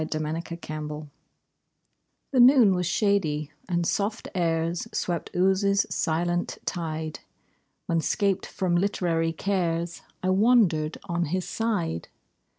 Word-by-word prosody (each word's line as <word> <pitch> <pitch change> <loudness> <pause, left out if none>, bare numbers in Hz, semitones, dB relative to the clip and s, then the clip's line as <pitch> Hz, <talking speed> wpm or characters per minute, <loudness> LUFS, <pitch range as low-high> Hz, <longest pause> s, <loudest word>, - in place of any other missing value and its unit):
BEAU - - -4 0.2
AND 160 +2 -2
THE 170 - -7
WATER 155 -2 -6
LILY 150 0 -6 1.2
The 265 - +2
noon 245 -5 +7
was 180 -2 0
shady, 165 -7 +1 0.2
and 175 -1 +1
soft 210 +5 -1
airs 165 -1 0
Swept 175 -2 -2
Ouse's 195 +2 +3
silent 175 +2 0
tide, 160 -3 -3 0.7
When 165 -1 +1
'scaped 195 +5 0
from 180 -3 -1
literary 170 -4 +1
cares 170 -2 -1 0.2
I 185 - +2
wandered 190 -7 +3
on 175 -2 -1
his 180 +3 -2
side. 200 - -2
175 Hz, 125 wpm, -26 LUFS, 165-195 Hz, 1.2 s, noon